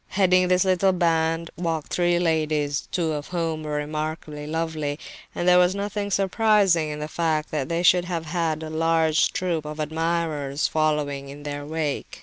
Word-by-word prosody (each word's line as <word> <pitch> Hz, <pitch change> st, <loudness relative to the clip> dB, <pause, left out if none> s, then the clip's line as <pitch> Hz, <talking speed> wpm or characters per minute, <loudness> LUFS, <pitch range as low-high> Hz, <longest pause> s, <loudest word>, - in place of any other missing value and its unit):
Heading 185 Hz, -2 st, +3 dB
this 180 Hz, +1 st, +3 dB
little 190 Hz, 0 st, +3 dB
band 165 Hz, -1 st, +1 dB
walked 165 Hz, -3 st, -3 dB
three 175 Hz, -1 st, +2 dB
ladies, 155 Hz, -4 st, 0 dB
two 165 Hz, -3 st, 0 dB
of 150 Hz, -1 st, -5 dB
whom 165 Hz, -3 st, -2 dB
were 150 Hz, -1 st, -5 dB
remarkably 150 Hz, 0 st, -4 dB
lovely; 155 Hz, -2 st, -2 dB, 0.4 s
and 175 Hz, -, -2 dB
there 180 Hz, 0 st, +7 dB
was 180 Hz, +1 st, +3 dB
nothing 205 Hz, 0 st, -3 dB
surprising 195 Hz, -4 st, +3 dB
in 150 Hz, -, -4 dB
the 150 Hz, 0 st, -4 dB
fact 155 Hz, -1 st, -1 dB
that 145 Hz, -4 st, -2 dB
they 170 Hz, +1 st, -1 dB
should 180 Hz, 0 st, +5 dB
have 170 Hz, -2 st, -3 dB
had 160 Hz, -1 st, -1 dB
a 155 Hz, -, -6 dB
large 160 Hz, 0 st, +2 dB
troop 180 Hz, -4 st, -1 dB
of 150 Hz, +1 st, -7 dB
admirers 155 Hz, -2 st, -1 dB
following 150 Hz, -3 st, -1 dB
in 145 Hz, +1 st, -10 dB
their 145 Hz, 0 st, -5 dB
wake. 155 Hz, -2 st, -3 dB
160 Hz, 170 wpm, -24 LUFS, 150-175 Hz, 0.4 s, there